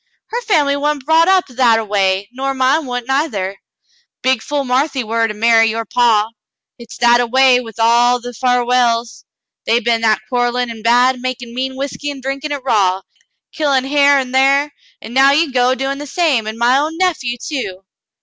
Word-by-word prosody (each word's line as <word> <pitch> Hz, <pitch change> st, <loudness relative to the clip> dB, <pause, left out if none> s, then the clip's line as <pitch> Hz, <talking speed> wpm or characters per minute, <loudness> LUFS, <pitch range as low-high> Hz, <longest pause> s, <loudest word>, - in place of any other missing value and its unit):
Her 475 Hz, +2 st, -2 dB
family 305 Hz, -11 st, +1 dB
wa'n't 285 Hz, -1 st, -2 dB
brought 325 Hz, +2 st, +3 dB
up 380 Hz, -1 st, +3 dB
that 250 Hz, -3 st, +2 dB
a 225 Hz, -, -3 dB
way, 195 Hz, -1 st, 0 dB
nor 270 Hz, +2 st, -3 dB
mine 265 Hz, +3 st, +1 dB
wa'n't 245 Hz, -1 st, -5 dB
neither. 210 Hz, -9 st, -2 dB, 0.6 s
Big 260 Hz, -3 st, +1 dB
fool 290 Hz, +2 st, -3 dB
Marthy 265 Hz, +1 st, -1 dB
war 225 Hz, +1 st, 0 dB
to 215 Hz, -, -6 dB
marry 225 Hz, +1 st, +3 dB
with -, -, 0 dB
your 225 Hz, 0 st, -4 dB
paw. 220 Hz, -2 st, +2 dB, 0.5 s
Hit's 235 Hz, 0 st, -12 dB
that 240 Hz, 0 st, +4 dB
a 240 Hz, -, -1 dB
way 260 Hz, +1 st, +4 dB
with 225 Hz, -4 st, -12 dB
all 240 Hz, +2 st, +3 dB
the 245 Hz, 0 st, -8 dB
Farwells; 245 Hz, -1 st, 0 dB, 0.4 s
they 230 Hz, -, +3 dB
been 230 Hz, -1 st, 0 dB
that 220 Hz, -1 st, +1 dB
quarellin' 245 Hz, 0 st, -1 dB
an' 225 Hz, -1 st, -10 dB
bad, 245 Hz, +3 st, +2 dB
makin' 245 Hz, -2 st, -5 dB
mean 260 Hz, +1 st, -4 dB
whiskey 280 Hz, +2 st, -5 dB
an' 285 Hz, -1 st, -7 dB
drinkin' 275 Hz, +3 st, -5 dB
hit 285 Hz, -3 st, -5 dB
raw, 195 Hz, -6 st, +1 dB, 0.5 s
killin' 280 Hz, -4 st, 0 dB
hyar 285 Hz, 0 st, +3 dB
an' 260 Hz, -2 st, -3 dB
thar, 275 Hz, +2 st, +2 dB, 0.3 s
an' 225 Hz, -, -9 dB
now 270 Hz, +2 st, +5 dB
you 300 Hz, -2 st, +1 dB
go 250 Hz, 0 st, +2 dB
doin' 270 Hz, +1 st, -3 dB
the 290 Hz, -, -7 dB
same, 280 Hz, -9 st, 0 dB
an' 220 Hz, +1 st, -5 dB
my 245 Hz, +3 st, +3 dB
own 315 Hz, +3 st, -3 dB
nephew, 315 Hz, -10 st, -1 dB
too." 230 Hz, -9 st, -6 dB
250 Hz, 190 wpm, -16 LUFS, 230-275 Hz, 0.6 s, now